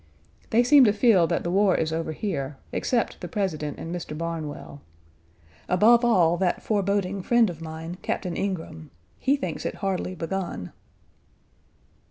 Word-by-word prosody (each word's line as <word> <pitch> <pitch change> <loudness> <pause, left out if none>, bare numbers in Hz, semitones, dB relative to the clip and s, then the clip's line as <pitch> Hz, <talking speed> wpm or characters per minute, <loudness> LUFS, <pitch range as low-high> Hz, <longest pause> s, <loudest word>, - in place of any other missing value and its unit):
They 235 +2 +4
seem 275 +2 +7
to 210 - +4
feel 205 -6 +4
that - - -1
the 170 - -2
war 195 0 +3
is 160 0 -1
over 160 0 -2
here, 145 -6 -4
except 240 -2 -1
the - - -5
President 160 - -3
and 165 - -6
Mr. 165 -3 -5
Barnwell; 160 -3 -5 0.9
above 230 +6 +5
all 175 -8 +4
that 185 -1 0
foreboding 200 -2 0
friend 235 0 +3
of 165 -1 -11
mine, 160 +2 -7
Captain 180 -3 -3
Ingraham. 160 - -4 0.3
He 275 +2 +2
thinks 275 - -4
it - - -3
hardly 185 -2 -2
begun. 170 - -4
180 Hz, 150 wpm, -25 LUFS, 160-205 Hz, 0.9 s, seem